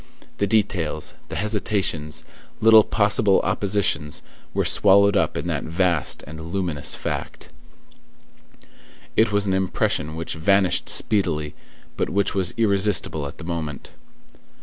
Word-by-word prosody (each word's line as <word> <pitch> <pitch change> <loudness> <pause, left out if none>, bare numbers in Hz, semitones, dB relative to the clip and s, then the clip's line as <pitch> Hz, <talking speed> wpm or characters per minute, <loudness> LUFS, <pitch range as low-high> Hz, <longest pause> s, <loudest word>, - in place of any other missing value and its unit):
The 100 - +1
details, 100 -7 0 0.2
the - - -5
hesitations, 100 -6 -1 0.4
little 110 -1 +7
possible 105 -1 +2
oppositions, 95 -6 -1 0.3
were - - -1
swallowed 100 +1 +5
up 100 - +1
in - - -4
that - - -2
vast 85 -3 0
and 80 +3 -9
luminous 85 -4 -2
fact. - - -5 1.7
It 110 0 +3
was 100 0 +2
an 95 - 0
impression 85 -4 -1
which 80 +1 -4
vanished 95 +3 +2
speedily, 80 -8 +1 0.4
but - - -1
which 100 +2 0
was 95 -2 0
irresistible 100 -8 +1
at 70 - -10
the - - -10
moment. 80 -4 -5
95 Hz, 125 wpm, -22 LUFS, 80-100 Hz, 1.7 s, little